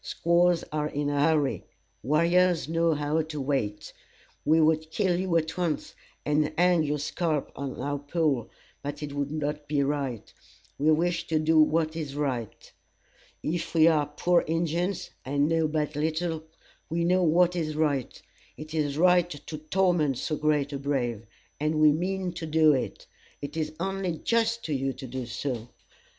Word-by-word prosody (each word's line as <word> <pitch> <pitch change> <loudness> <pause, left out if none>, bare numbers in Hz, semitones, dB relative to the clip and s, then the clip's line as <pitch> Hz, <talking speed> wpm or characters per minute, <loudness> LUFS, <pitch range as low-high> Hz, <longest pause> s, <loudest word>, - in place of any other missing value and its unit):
Squaws 170 0 +2
are 150 0 -1
in 145 -1 -2
a 145 - 0
hurry; 150 -2 +2 0.4
warriors 170 +5 +3
know 165 0 +2
how 150 +2 0
to 155 -1 -6
wait. 130 -7 -2 0.5
We 160 +2 +4
would 160 0 +2
kill 180 0 +1
you 185 -2 +1
at 160 -1 -2
once, 175 -4 -2 0.3
and 150 0 +1
hang 180 -1 +4
your 150 -1 0
scalp 150 0 -2
on 140 -1 -5
our 145 +2 -2
pole, 145 -5 0 0.3
but 145 +1 -5
it 145 -1 -5
would 145 0 -2
not 150 -1 -3
be 145 -1 +1
right. 135 -5 -3 0.5
We 155 +3 +4
wish 170 +2 +1
to 160 - +1
do 155 +1 +3
what 155 +1 +2
is 150 -4 -5
right. 130 -7 -4 0.7
If 170 +1 -3
we 160 0 +6
are 150 -3 +3
poor 175 +4 +2
Injins, 170 +3 -1
and 140 +2 +1
know 165 -1 +2
but 150 -1 -2
little, 160 +1 -1 0.4
we 170 +1 0
know 180 +2 +3
what 175 +1 +3
is 155 -3 -2
right. 145 -5 -1 0.4
It 155 +1 -9
is 150 -3 -1
right 180 0 +4
to 155 0 -7
torment 155 -4 +1
so 155 - -2
great 150 -2 0
a 140 - -3
brave, 120 -6 -2 0.3
and 155 +2 0
we 155 -1 +7
mean 185 +3 -1
to 165 -2 -5
do 155 -1 +5
it. 130 - -3 0.3
It 145 - -7
is 155 -1 -2
only 190 -2 -2
just 230 +4 0
to 155 - -2
you 135 0 -1
to 130 +2 -9
do 130 -1 -5
so. 120 0 -4
155 Hz, 170 wpm, -27 LUFS, 145-170 Hz, 0.7 s, we